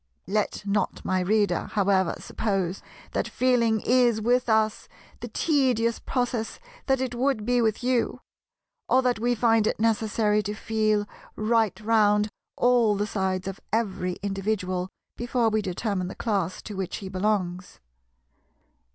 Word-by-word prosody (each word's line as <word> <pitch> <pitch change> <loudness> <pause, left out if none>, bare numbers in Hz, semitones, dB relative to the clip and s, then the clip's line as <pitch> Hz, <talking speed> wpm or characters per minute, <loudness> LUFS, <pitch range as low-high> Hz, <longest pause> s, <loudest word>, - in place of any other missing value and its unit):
Let 210 +2 -1
not 205 +1 -1
my 185 0 +1
Reader 205 +3 +1
however 195 -3 +2
suppose 195 -4 -2 0.3
that - - -1
"feeling" 235 -4 +2
is 245 -2 +3
with 245 +2 +1
us 220 -1 +1 0.3
the - - -6
tedious 250 -7 +1
process 245 -3 -2 0.3
that 265 -1 +2
it 260 -1 -2
would 245 -3 0
be 245 0 +2
with 220 0 0
you, 250 -1 0 0.7
or 260 +1 +4
that 250 -3 +1
we 240 +2 +1
find 225 -2 +3
it - - -1
necessary 215 -1 +2
to 210 +1 -4
feel 215 -1 0 0.3
right 220 -1 +1
round 210 -1 +3 0.3
all 240 -4 +3
the 205 +1 0
sides 190 -2 -2
of 195 0 -5
every 195 -5 -1
individual 195 -2 -2 0.3
before 240 -1 +1
we 215 0 +1
determine 190 -1 -2
the - - -7
class 195 -6 -2
to 210 - -7
which 190 -2 -3
he 195 - -7
belongs. 185 -2 -2
215 Hz, 140 wpm, -26 LUFS, 195-235 Hz, 0.7 s, or